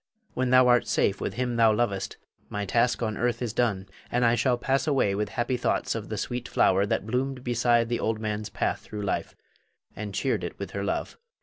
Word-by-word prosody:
When 130 0 0
thou 130 0 +6
art 120 -1 +4
safe 100 - +1
with - - -3
him 125 -1 -1
thou 115 -1 +6
lovest, 105 -3 -1 0.3
my 105 0 -3
task 120 +4 +1
on 110 -2 -2
earth 120 -1 0
is 120 -4 -3
done, 105 -6 0 0.2
and 125 0 +2
I 115 - +4
shall 125 +1 +2
pass 135 +4 0
away 135 -9 +2
with 105 +1 -1
happy 120 +5 -1
thoughts 125 - 0
of - - -5
the - - -3
sweet 120 0 -3
flower 95 +2 +3
that 100 - -1
bloomed 125 +3 -2
beside 120 -1 +2
the 120 0 -1
old 110 0 -1
man's 105 -1 -3
path - - -1
through 105 -1 -7
life, 100 - -2 0.6
and 105 -1 -5
cheered 135 - 0
it - - -5
with - - -6
her - - -3
love. - - -2
120 Hz, 215 wpm, -27 LUFS, 105-125 Hz, 0.6 s, thou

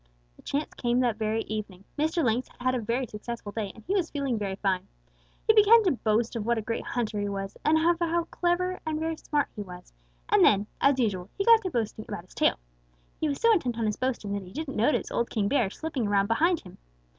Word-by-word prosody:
"The - - -18
chance 290 +2 -3
came 240 0 0
that 240 -4 +1
very 220 0 -1
evening. 205 -3 -6
Mr. 315 +3 +1
Lynx 240 +2 +1
had - - -23
had 255 +1 +1
a 255 - 0
very 235 +4 -1
successful 215 -1 -7
day, 205 -2 -3
and 220 - -14
he 385 - -1
was 370 -5 +1
feeling 280 -4 -1
very 200 -3 -2
fine. 190 -2 -1 0.6
He 440 - +6
began 435 +2 +7
to 370 - +3
boast 230 -1 0
of 225 - -2
what 235 +2 +1
a - - -1
great 230 +1 -3
hunter 220 -4 -2
he 205 0 -1
was, 195 0 -4
and 310 +1 +4
of 315 - +1 0.2
how 340 - +1
very 340 0 0
clever 365 +1 0
and 310 -1 -2
very 320 0 -2
smart 295 -2 -1
he 210 - -5
was, 180 - -10 0.3
and - - +4
then, 205 0 +5 0.2
as 275 -1 +4
usual, 195 -6 0
he 395 - 0
got 460 -1 +7
to 380 - -3
boasting 220 -6 -3
about 205 -5 -6
his - - -19
tail. - - +2 0.6
He 310 - 0
was 280 - -2
so 460 0 +5
intent 250 - 0
on 230 - 0
his 210 -1 0
boasting 240 -6 -2
that 200 - -2
he 185 -1 -12
didn't 295 -1 -5
notice 235 +8 +1
old 235 - 0
King 210 -3 0
Bear 240 -5 +2
slipping 270 -2 -3
around 200 -1 +3
behind 325 - +2
him. 180 - -14
235 Hz, 245 wpm, -27 LUFS, 210-315 Hz, 0.6 s, began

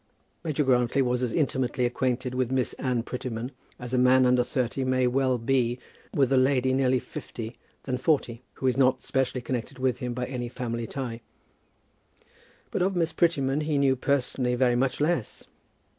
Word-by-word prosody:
Major 155 -2 0
Grantly 125 0 +2
was 125 0 0
as 125 -2 0
intimately 130 -5 0
acquainted 125 +1 -1
with 125 -1 0
Miss 130 -2 0
Anne 125 -3 0
Prettyman 125 0 -5 0.3
as 125 0 -7
a 125 - +3
man 130 +1 +5
under 125 0 +4
thirty 130 +1 -1
may 130 0 +2
well 130 0 +2
be 120 0 +1 0.3
with 135 -1 +2
a - - +4
lady 130 0 +3
nearer 130 -1 +2
fifty 115 -1 -8 0.3
than 125 -2 -2
forty, 130 -5 0
who - - -6
is 130 -1 +2
not 130 -1 +3
specially 130 -1 -1
connected 125 +1 -4
with 130 -2 0
him 125 -1 -3
by 125 0 -2
any 125 -2 -4
family 115 -2 -4
tie; 120 -4 -5 1.5
but - - -1
of 190 +1 +1
Miss 165 -2 0
Prettyman 145 -4 +1
he 150 -1 0
knew 135 -1 +3
personally 130 -2 0
very 125 -1 +3
much 130 +1 0
less. 150 -5 -1
130 Hz, 175 wpm, -27 LUFS, 125-135 Hz, 1.5 s, man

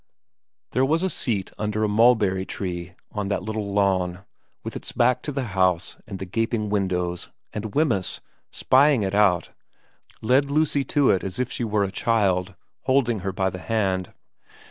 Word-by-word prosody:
n - - -60
THERE 130 +1 +2
was 160 +5 +1
a 190 - 0
seat 100 -6 -1
under 105 0 -1
a - - +3
mulberry 105 -3 +3
tree 90 -2 -5 0.2
on 105 -1 -3
the 100 - 0
little 105 0 -4
lawn, 95 -2 0 0.4
with - - -6
its - - -6
back 125 +1 +2
to 150 - -4
the 135 -1 -2
house 90 -3 +1
and 95 - -6
the 95 - -6
gaping 110 +2 -1
windows, 90 -3 -1 0.2
and 105 -1 -5
Wemyss, 125 - +1 0.3
spying 135 -3 +3
it 95 0 -2
out, 100 -4 +3 0.7
led 135 +5 +3
Lucy 145 -1 +2
to 145 -2 +3
it 95 - +1
as 95 -2 -4
if 125 0 -1
she - - -2
were 105 -2 +1
a 95 - -2
child, 95 -4 +1 0.3
holding 125 -4 +2
her 95 +1 -3
by 95 0 0
the 90 - -7
hand. 95 -4 -1
105 Hz, 175 wpm, -24 LUFS, 95-120 Hz, 0.7 s, a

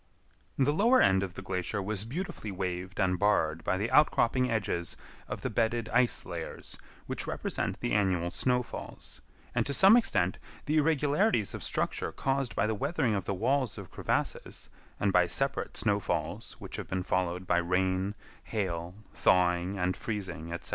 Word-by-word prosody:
The 140 +2 +3
lower 235 +10 +5
end 95 0 +4
of 95 -2 -4
the - - -7
glacier 95 +2 -2
was 100 +1 -2
beautifully 130 - -5
waved 95 0 -4
and 90 -2 +2
barred 80 -6 +2
by 95 - 0
the 105 +4 -2
outcropping 130 -4 +4
edges 100 -6 -2 0.3
of - - -5
the - - 0
bedded 115 0 0
ice 125 0 +3
layers 85 -2 -6 0.3
which - - -4
represent - - -2
the - - -1
annual 90 -4 +1
snowfalls, 125 +3 -3 0.3
and - - +2
to 140 - 0
some 195 +3 +8
extent 95 - +2 0.3
the 155 +2 +1
irregularities 150 - +2
of - - -6
structure - - -1
caused 135 -2 -1
by - - +2
the 110 - 0
weathering 130 0 0
of 100 -2 -1
the 100 - -1
walls 125 +2 +1
of - - -9
crevasses, - - -2 0.3
and 100 -2 +1
by 90 -1 +5
separate 135 +10 0
snowfalls 105 -3 -1
which - - -8
have - - -5
been 95 0 -2
followed 90 0 -1
by 90 - +2
rain, 95 +3 0 0.3
hail, 90 -4 -3 0.2
thawing 90 +1 +2
and 90 0 0
freezing, 95 -7 -5
etc. 85 - -3
100 Hz, 165 wpm, -30 LUFS, 90-125 Hz, 0.3 s, some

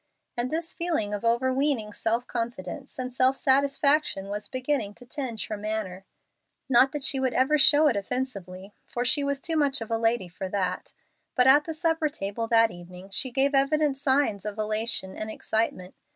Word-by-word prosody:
And 240 +1 -2
this 330 +3 -3
feeling 320 - -2
of 205 - -4
overweening 255 -1 0
self 230 +3 -1
confidence 235 +2 -6
and 255 -1 -5
self 260 +1 +2
satisfaction 280 -5 +2
was 205 +1 -5
beginning 255 -5 -2
to 245 - -14
tinge 245 -4 -5
her 215 - -5
manner. 205 -3 -5 0.6
Not 265 +1 +4
that 295 -2 -4
she 270 0 +5
would 260 -2 -1
ever 280 +4 +2
show 295 +2 +8
it 280 -7 +3
offensively, 200 -4 -5
for 245 0 -3
she 285 +3 +4
was 280 0 -2
too 330 +1 -3
much 285 -3 +2
of 225 0 -7
a 225 - 0
lady 225 -4 0
for 185 +2 -7
that. 185 -2 -3 0.4
But 250 - +4
at 285 +3 +6
the 320 - -5
supper 325 -1 0
table 215 -2 -5
that 225 -1 +4
evening 180 +2 -12
she 260 +7 +2
gave 275 +3 +1
evident 285 +1 +2
signs 265 -7 +1
of 210 0 -5
elation 215 -2 0
and 215 - -5
excitement. 215 -4 -3
245 Hz, 180 wpm, -26 LUFS, 210-280 Hz, 0.6 s, show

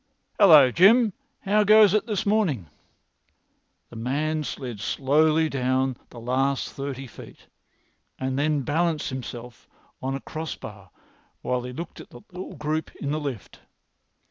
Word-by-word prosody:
"Hallo, 155 -10 +8
Jim, 210 - +5 0.3
how 210 +2 +2
goes 215 -1 +6
it 215 +1 +1
this 210 -3 -2
morning?" 200 - +1 1.3
The - - -11
man 150 +7 -1
slid 125 -6 -6
swiftly 155 +7 +2
down 130 -1 0
the 120 - -11
last 130 +3 -1
thirty 135 -1 -5
feet, 115 - -13 0.7
and 130 0 -3
then 150 0 +1
balanced 160 +2 0
himself 125 -2 -8 0.3
on 135 +1 -2
a - - -4
cross 160 +3 -6
bar - - -11 0.5
while 125 0 -1
he 125 +1 -7
looked 160 +6 -8
at - - -14
the 120 - -13
little 180 +1 -8
group 155 +1 -3
in 140 - -4
the 155 - -1
lift. 135 -8 -6
145 Hz, 145 wpm, -25 LUFS, 130-165 Hz, 1.3 s, Hallo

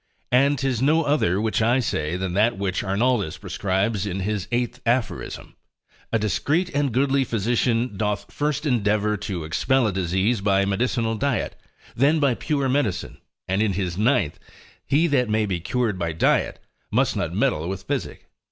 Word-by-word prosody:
And 140 +3 +4
'tis 130 -3 -1
no 155 +4 +3
other 140 - +1
which 110 +1 0
I 120 +4 +3
say, 80 -8 -1
than 95 -1 -3
that 110 +3 +2
which 95 -2 -1
Arnoldus 100 -2 0
prescribes 100 +1 -1
in 95 0 -3
his 105 -1 -2
8. 120 +1 -1
Aphoris. 120 0 -1 0.7
A 115 - +3
discreet 150 - 0
and 145 -2 +1
goodly 135 +3 +2
physician 115 0 0
doth 105 0 -2
first 150 0 -1
endeavour 105 -5 +1
to 95 -4 -4
expel 130 +11 +1
a 105 - 0
disease 95 +5 0
by 100 -1 +2
medicinal 115 +3 0
diet, 130 +2 -1 0.4
than 145 +6 +3
by 140 -4 +3
pure 140 +2 -1
medicine: 130 -8 -1 0.3
and 95 +2 +1
in 110 -3 +1
his 90 -3 -2
ninth, 110 - +1 0.5
he 150 +5 +3
that 130 -7 +1
may 110 0 +2
be 95 -4 -2
cured 110 +1 -1
by 85 -2 -1
diet, 80 - +1 0.3
must - - +1
not - - -2
meddle 80 +3 0
with 95 -1 -5
physic. - - -4
110 Hz, 165 wpm, -23 LUFS, 95-130 Hz, 0.7 s, And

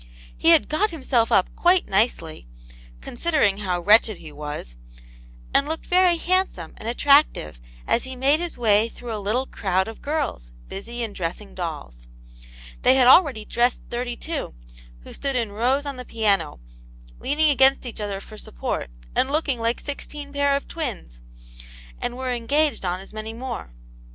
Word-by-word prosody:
He 330 - +2
had 330 -3 +6
got 400 +8 +1
himself 260 -8 0
up 185 - +2
quite 355 +1 +3
nicely, 190 - 0 0.5
considering 240 -8 +1
how 185 -4 -2
wretched 215 +1 +5
he 155 - -11
was, 145 - -7 0.8
and 280 - +3
looked 320 +1 -4
very 360 -1 +4
handsome 360 - 0
and 225 - -5
attractive 245 - +3 0.2
as 235 - +1
he 260 0 -5
made 275 +4 +3
his 345 -1 -4
way 220 -1 +3
through 235 0 -8
a 210 - -5
little 225 +6 0
crowd 190 -5 -1
of 225 - -9
girls, 285 - -3 0.2
busy 235 +5 -6
in 220 -3 -5
dressing 185 +3 -5
dolls. - - -6 0.7
They 255 - +5
had 255 -2 +5
already 260 - +5
dressed 240 +3 +1
thirty 240 0 -3
two, 320 - -3 0.5
who - - -12
stood 275 -1 -2
in 230 -4 -1
rows 255 +7 0
on 280 -2 -5
the 250 - -6
piano, 200 - 0 0.6
leaning 300 +2 +2
against 270 -1 +4
each 235 -3 -6
other 200 -2 -3
for 215 +2 -12
support, - - -4 0.3
and 260 - +2
looking 285 -4 0
like 230 +1 0
sixteen 285 0 -7
pair 285 0 +2
of 280 - -3
twins; 235 - -6 0.8
and 245 - -3
were 260 -1 -2
engaged 285 +5 0
on 180 0 -1
as 195 - -13
many 215 +1 -6
more. 240 - -6
240 Hz, 165 wpm, -23 LUFS, 200-285 Hz, 0.8 s, had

